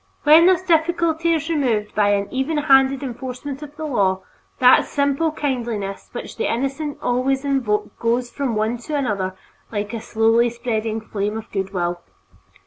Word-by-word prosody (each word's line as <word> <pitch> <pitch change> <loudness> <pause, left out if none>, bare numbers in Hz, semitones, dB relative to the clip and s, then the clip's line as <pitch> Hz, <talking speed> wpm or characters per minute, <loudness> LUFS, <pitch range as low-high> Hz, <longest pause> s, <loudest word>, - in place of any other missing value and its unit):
When 315 +3 +7
this 370 -1 +3
difficulty 335 -1 +1
is 320 -2 0
removed 245 -10 0
by 205 -1 +2
an 200 0 -2
even 265 +4 -1
handed 270 -2 +4
enforcement 260 +2 -6
of 295 -1 -10
the 315 0 -5
law, 195 -9 +1 0.4
that 250 0 +6
simple 280 +3 0
kindliness 235 -9 -3
which 240 - -7
the - - 0
innocent 275 +4 -2
always 265 +3 0
evoke 255 -7 -1
goes 240 +1 0
from 270 -5 -2
one 220 +3 -1
to 295 +6 -5
another 200 -9 -1 0.4
like 205 0 -3
a 230 - -4
slowly 225 +2 +2
spreading 225 -2 -3
flame 210 0 -3
of 220 - -9
good 195 -1 -3
will. 175 -2 -2
250 Hz, 160 wpm, -21 LUFS, 215-290 Hz, 0.4 s, When